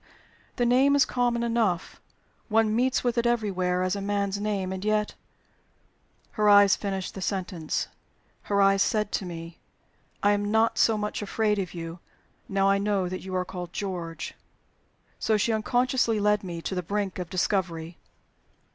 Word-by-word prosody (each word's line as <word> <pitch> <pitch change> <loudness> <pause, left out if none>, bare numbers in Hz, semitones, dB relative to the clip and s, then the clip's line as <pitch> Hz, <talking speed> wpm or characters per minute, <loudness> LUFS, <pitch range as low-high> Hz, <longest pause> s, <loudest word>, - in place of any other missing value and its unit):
"The 245 - +1
name 265 +4 +4
is 280 -2 +5
common 240 -2 0
enough: 230 -7 -1 0.5
one 220 0 +3
meets 255 +2 +1
with 245 -1 +1
it 235 - +1
everywhere 185 -6 0
as 185 +1 0
a 200 - -4
man's 200 0 -1
name 200 -3 -2
And 190 0 -5
yet 215 0 +1 0.6
" - - -39
Her 210 -1 +2
eyes 205 -1 +7
finished 195 -2 -4
the 195 - -7
sentence; 185 -5 -2 0.6
her 200 -1 +4
eyes 195 0 +4
said 210 -1 +1
to 190 - -2
me, 165 -1 -8 0.6
"I 205 - +5
am 205 0 0
not 220 +1 +2
so 225 -1 +4
much 210 0 -3
afraid 210 0 0
of 185 -2 -4
you, 165 0 -6 0.5
now 195 0 +2
I 195 0 +3
know 200 -2 0
that 185 0 -5
you 185 0 -6
are 180 0 0
called 180 -1 -7
'George.'" 175 -5 -4 0.9
So 220 -1 +2
she 225 +2 +1
unconsciously 245 0 +1
led 210 0 +2
me 170 -3 -6
to - - -3
the 180 - -1
brink 200 +1 -3
of 180 -2 -5
discovery! 175 -3 -1
200 Hz, 170 wpm, -26 LUFS, 185-215 Hz, 0.9 s, eyes